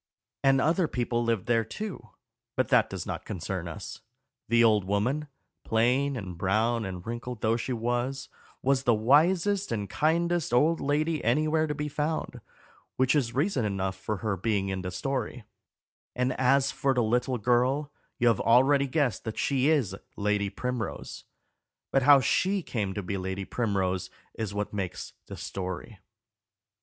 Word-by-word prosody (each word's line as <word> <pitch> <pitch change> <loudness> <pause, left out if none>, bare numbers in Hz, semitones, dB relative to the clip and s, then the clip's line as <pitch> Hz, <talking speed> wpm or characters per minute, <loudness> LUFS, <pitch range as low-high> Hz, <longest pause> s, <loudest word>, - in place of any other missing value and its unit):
And 135 -1 +5
other 165 +5 +2
people 120 -2 -1
lived 115 -3 0
there 115 -1 +2
too; 200 - -7 0.5
but 130 0 0
that 125 -4 +4
does 95 -2 -5
not 90 -2 -4
concern 95 -2 -4
us. 80 - -7 0.5
The 115 0 +5
old 105 -3 +4
woman, 115 +10 0 0.4
plain 125 +5 +2
and 90 -6 -7
brown 110 +4 +1
and 90 -2 -6
wrinkled 120 0 -5
though 110 0 +2
she 120 +2 -3
was, 120 +3 -2 0.4
was 135 0 +3
the 120 -3 +3
wisest 170 - +3
and 105 -3 -2
kindest 170 - +1
old 160 +6 +3
lady 155 +2 0
anywhere 155 +6 +2
to 150 - -2
be 150 +1 -3
found, 150 +2 -3 0.5
which 130 0 +3
is 125 -6 0
reason 145 - +1
enough 95 -2 -1
for 100 +2 -4
her 105 -2 +1
being 100 0 -1
in 95 -1 -2
the 90 - -4
story; 120 +5 -3 0.7
and 125 +1 +1
as 135 +1 +3
for 135 -1 0
the 120 - +2
little 125 +3 +1
girl, 125 +6 +1 0.3
you 120 - +2
have 115 -3 +3
already 135 +4 +4
guessed 130 -6 0
that 110 - -4
she 135 0 +2
is 135 -12 +2 0.2
Lady 105 -1 0
Primrose; 125 -1 -5 0.7
but 135 - +3
how 140 +1 +7
she 185 - +1
came 100 -8 -3
to 100 - -3
be 100 +2 -3
Lady 95 +1 -4
Primrose 95 -6 -1 0.2
is 110 -3 -4
what 105 +1 -3
makes 95 -3 -4
the - - -8
story. 95 +2 -6
120 Hz, 160 wpm, -28 LUFS, 105-140 Hz, 0.7 s, how